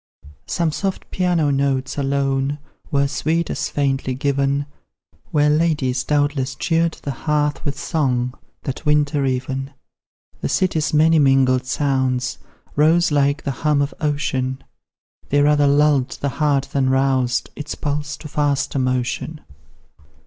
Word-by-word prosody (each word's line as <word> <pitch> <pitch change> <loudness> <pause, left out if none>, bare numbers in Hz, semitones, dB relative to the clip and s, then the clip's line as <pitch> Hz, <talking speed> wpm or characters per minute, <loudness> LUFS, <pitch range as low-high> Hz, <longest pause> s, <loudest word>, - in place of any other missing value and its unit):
Some 170 -2 0
soft 195 +4 -4
piano 175 -5 +1
notes 135 -1 0
alone 140 0 0 0.3
Were 140 -1 +2
sweet 160 +4 -1
as - - -2
faintly 135 -2 -1
given, 140 +1 0 0.6
Where 150 -1 +3
ladies, 150 -5 +1
doubtless, 145 -3 0
cheered 165 +2 +1
the 140 - -2
hearth 150 +1 -1
With 145 -1 -3
song 125 -7 0 0.3
that 135 - -5
winter 150 -1 +2
even. 130 +1 -2 0.7
The - - -2
city's 160 -5 +1
many 160 +1 +4
mingled 135 -2 +3
sounds 130 -2 0 0.4
Rose 160 +3 +4
like 140 +1 +2
the 140 - -1
hum 150 -2 +2
of 140 0 0
ocean; 135 -3 -1 0.7
They 145 +1 +3
rather 145 0 +4
lulled 145 -2 +3
the 140 - -1
heart 140 0 0
than 135 -2 +2
roused 130 -2 +1
Its 150 0 -5
pulse 150 +1 -3
to 155 - -9
faster 145 -2 0
motion. 130 +4 -2
140 Hz, 130 wpm, -21 LUFS, 135-150 Hz, 0.7 s, many